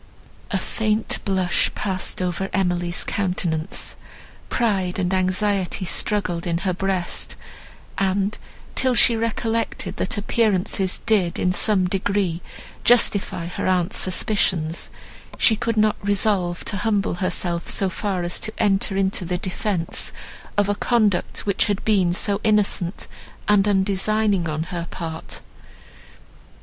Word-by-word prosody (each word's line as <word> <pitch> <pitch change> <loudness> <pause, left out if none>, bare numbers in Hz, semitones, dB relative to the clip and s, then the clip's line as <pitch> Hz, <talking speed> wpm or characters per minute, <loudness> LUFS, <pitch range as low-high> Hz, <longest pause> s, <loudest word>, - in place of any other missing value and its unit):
A 205 - 0
faint 215 +3 -1
blush 185 -3 +2
passed 185 -2 -1
over 180 +2 -2
Emily's 175 -2 0
countenance; 180 -5 -1 0.5
pride 195 -6 0
and 185 -1 0
anxiety 185 0 0
struggled 180 -2 +1
in 170 -1 0
her 185 - +1
breast; 190 -1 -1 0.6
and, 195 +1 +1 0.4
till 255 -1 +1
she 235 0 +6
recollected, 230 0 -1
that 195 - -1
appearances 200 -3 +1
did, 200 -7 +2
in 180 - +1
some 200 -1 +3
degree, 190 -2 -1 0.4
justify 200 -7 +3
her 180 - -3
aunt's 180 -2 +1
suspicions, 175 -4 0 0.5
she 220 - +5
could 225 +1 -2
not 215 0 +3
resolve 195 -3 +1
to 200 - -1
humble 205 -1 0
herself 175 -2 -1
so 195 - +1
far 190 -1 -2
as 175 - -2
to 215 - -2
enter 195 -1 +2
into 190 0 +1
the 180 +1 -2
defence 185 -1 -2 0.5
of 205 -1 +3
a 205 - +2
conduct, 210 -3 +1
which 200 -2 +2
had 205 -2 -2
been 195 -5 +3
so 200 +3 +1
innocent 205 -4 +1 0.4
and 210 -1 +4
undesigning 200 -1 +1
on 155 +1 -2
her 170 -1 -3
part. 160 -2 -6
195 Hz, 125 wpm, -22 LUFS, 180-210 Hz, 0.6 s, she